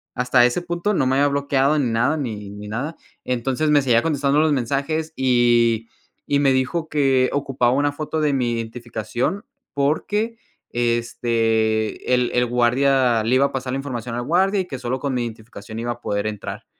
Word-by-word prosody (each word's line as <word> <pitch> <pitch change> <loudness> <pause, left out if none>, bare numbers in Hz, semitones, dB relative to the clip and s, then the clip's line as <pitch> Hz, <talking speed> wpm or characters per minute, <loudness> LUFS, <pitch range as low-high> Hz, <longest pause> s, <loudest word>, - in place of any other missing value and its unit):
hasta 125 0 +4
ese 125 +8 0
punto 175 +4 -2
no 155 - +1
me 130 - +2
había 145 +1 +3
bloqueado 140 0 +1
en 125 -6 0
nada 125 +7 +2
ni 105 -8 -5
ni 105 0 -9
nada. 135 +9 -4 0.3
Entonces, 130 +4 -1
me 145 -1 +5
seguía 120 -3 +3
contestando 145 -2 +1
los 155 -1 +3
mensajes, 140 +5 -1
y 120 -3 +2 0.4
y 140 - +2
me 135 -2 +3
dijo 140 +6 -1
que 135 -3 +2
ocupaba 135 -3 +1
una 145 +2 +1
foto 155 +1 -3
de 150 -1 +2
mi 125 -3 0
identificación 120 - -3 0.3
porque, 210 +11 -1 0.3
este, 115 -2 0
el 125 -1 +2
el 125 0 +2
guardia 125 0 +2
le 120 +3 +2
iba 135 +2 +4
a - - -11
pasar 130 -1 -3
la - - -1
información 125 -4 -5
al 120 - -2
guardia, 190 +6 +2
y - - -5
que 135 -6 -6
solo 125 +1 -3
con 140 0 -2
mi 125 -1 0
identificación 110 -1 -8
iba 120 +1 -2
a 120 - -17
poder 100 -1 -2
entrar. 105 0 -6
130 Hz, 185 wpm, -21 LUFS, 120-145 Hz, 0.4 s, me